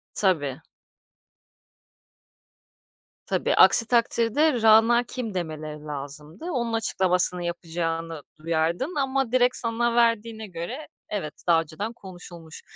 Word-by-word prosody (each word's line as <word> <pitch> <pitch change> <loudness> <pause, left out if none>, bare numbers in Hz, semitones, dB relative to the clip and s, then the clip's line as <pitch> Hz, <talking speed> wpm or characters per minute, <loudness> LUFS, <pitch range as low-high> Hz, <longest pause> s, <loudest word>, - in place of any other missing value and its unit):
Tabii. 155 -7 -1 2.6
Tabii, - - -1
aksi 230 - +8
takdirde 240 +3 +1
Rana 225 +2 +5
kim 235 -3 -6
demeleri 155 -3 -6
lazımdı. 150 - -7
Onun 235 -9 -3
açıklamasını 180 -5 +2
yapacağını 165 -2 -4 0.2
duyardın 165 - -2
ama 270 -3 -1
direkt 250 0 +2
sana 235 0 0
verdiğine 230 -2 0
göre, 190 - -7 0.2
evet, 185 -8 -5
daha 165 -1 +4
önceden 200 +9 -6
konuşulmuş. 175 -6 -12
195 Hz, 100 wpm, -24 LUFS, 165-235 Hz, 2.6 s, aksi